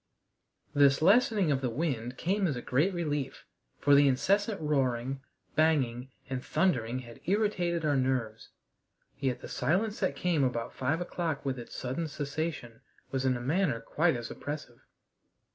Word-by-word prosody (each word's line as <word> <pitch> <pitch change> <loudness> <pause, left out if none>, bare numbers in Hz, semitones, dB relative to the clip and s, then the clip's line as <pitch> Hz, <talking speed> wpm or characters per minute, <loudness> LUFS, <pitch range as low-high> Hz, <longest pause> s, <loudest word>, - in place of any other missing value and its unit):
This 140 -2 +5
lessening 205 -3 +4
of 135 -1 +1
the 130 - 0
wind 125 -3 -2
came 195 +2 +1
as 145 - -1
a 120 - -4
great 150 +10 +2
relief, 150 -6 -3 0.3
for 145 - +3
the 140 0 +7
incessant 200 - +2
roaring, 135 -3 0 0.3
banging, 135 -6 +2 0.2
and 130 -1 -4
thundering 125 -10 +1
had 120 -1 -13
irritated 180 -4 +1
our 145 -1 +2
nerves. 130 -5 -1 0.7
Yet 130 -3 -1
the - - -7
silence 195 - 0
that 190 - 0
came 170 -5 +1
about 120 -3 -1
five 140 +6 -1
o'clock 170 -5 -3
with 130 -2 -1
its 120 - -9
sudden 130 +6 -3
cessation 145 -5 -4 0.3
was 135 -1 -1
in 130 -1 +2
a - - -7
manner 150 -1 +1
quite 160 +7 +1
as 120 -1 -5
oppressive. 145 -5 -6
140 Hz, 155 wpm, -30 LUFS, 125-170 Hz, 0.7 s, the